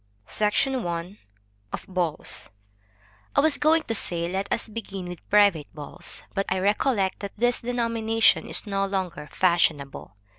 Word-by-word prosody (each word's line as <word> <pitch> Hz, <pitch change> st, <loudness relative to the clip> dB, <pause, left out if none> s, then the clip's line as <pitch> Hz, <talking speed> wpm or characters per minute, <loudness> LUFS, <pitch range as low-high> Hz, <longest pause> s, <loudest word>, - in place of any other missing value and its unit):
SECTION 245 Hz, -, 0 dB
I. 175 Hz, +4 st, -4 dB, 0.5 s
Of -, -, -5 dB
Balls. 175 Hz, -5 st, -2 dB, 0.9 s
I -, -, +5 dB
was 310 Hz, 0 st, +3 dB
going 315 Hz, +2 st, +4 dB
to 225 Hz, -, -3 dB
say, 170 Hz, -5 st, +1 dB
let 190 Hz, +3 st, -3 dB
us 230 Hz, -, -1 dB
begin 205 Hz, -4 st, -6 dB
with 175 Hz, -1 st, -9 dB
private 200 Hz, -8 st, +4 dB
balls; 145 Hz, -2 st, -5 dB
but 195 Hz, -, -1 dB
I 190 Hz, -, +1 dB
recollect 200 Hz, +1 st, +1 dB
that 200 Hz, 0 st, -7 dB
this 245 Hz, +2 st, +2 dB
denomination 230 Hz, -2 st, +2 dB
is -, -, +2 dB
no 195 Hz, -1 st, 0 dB
longer 185 Hz, -6 st, -3 dB
fashionable. 155 Hz, -, +1 dB
195 Hz, 145 wpm, -25 LUFS, 175-225 Hz, 0.9 s, I